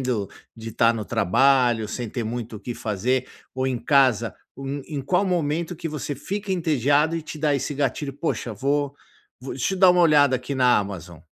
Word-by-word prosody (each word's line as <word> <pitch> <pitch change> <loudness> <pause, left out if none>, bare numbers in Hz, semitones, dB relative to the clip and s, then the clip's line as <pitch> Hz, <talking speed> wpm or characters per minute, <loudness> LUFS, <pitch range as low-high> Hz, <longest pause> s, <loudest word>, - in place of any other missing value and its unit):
do 120 -7 -1 0.3
de 115 0 -7
estar 115 +1 +3
no 110 -2 -4
trabalho, 120 +2 +2
sem 120 +2 -4
ter 120 +1 -4
muito 115 -1 -5
o - - -11
que 120 - -5
fazer, 120 +5 -1 0.3
um 130 - -5
ou 130 - +1
em 130 -2 -1
casa, 130 -5 +3 0.5
em 145 -3 -4
qual 180 +8 +1
momento 170 -1 -1
que 165 - -5
você 150 -1 -4
fica 200 +8 -4
entediado 150 -2 +2
e 165 - -4
te 155 0 -8
dá 150 -1 +1
esse 140 +2 -2
gatilho, 140 0 -2
"Poxa 140 -5 -3
vou 140 +4 -1 0.5
vou 130 - -6
deixa 135 +9 -1
eu - - -6
dar 185 -1 +7
uma 180 0 +3
olhada 145 -5 +5
aqui 125 +3 -5
na 125 -2 +4
Amazon". 90 -5 -6
135 Hz, 200 wpm, -23 LUFS, 120-150 Hz, 0.5 s, dar